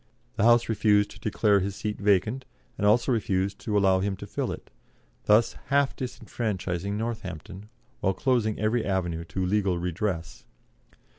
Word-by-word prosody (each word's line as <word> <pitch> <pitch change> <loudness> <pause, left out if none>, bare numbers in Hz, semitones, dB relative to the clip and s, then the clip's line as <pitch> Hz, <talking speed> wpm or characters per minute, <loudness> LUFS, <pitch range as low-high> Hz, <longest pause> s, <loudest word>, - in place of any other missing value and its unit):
The 110 -1 +1
House 120 0 +5
refused 105 -2 +2
to - - -13
declare 105 -1 +2
his 100 +1 -3
seat 105 0 -4
vacant, 105 +5 +2 0.3
and 105 - 0
also 120 +5 +3
refused 100 -4 0
to 105 -2 -1
allow 95 -2 +4
him 100 +1 -1
to - - -8
fill - - -3
it, - - -9 0.5
thus 105 +2 +4
half 140 0 +2
disfranchising 100 -6 -3
Northampton, 100 -3 -6 0.3
while 95 - 0
closing 120 -5 +1
every 110 +2 +1
avenue 85 -4 -1
to 95 +2 -3
legal 95 -1 +1
redress. 85 -4 -3
105 Hz, 150 wpm, -27 LUFS, 95-110 Hz, 0.5 s, House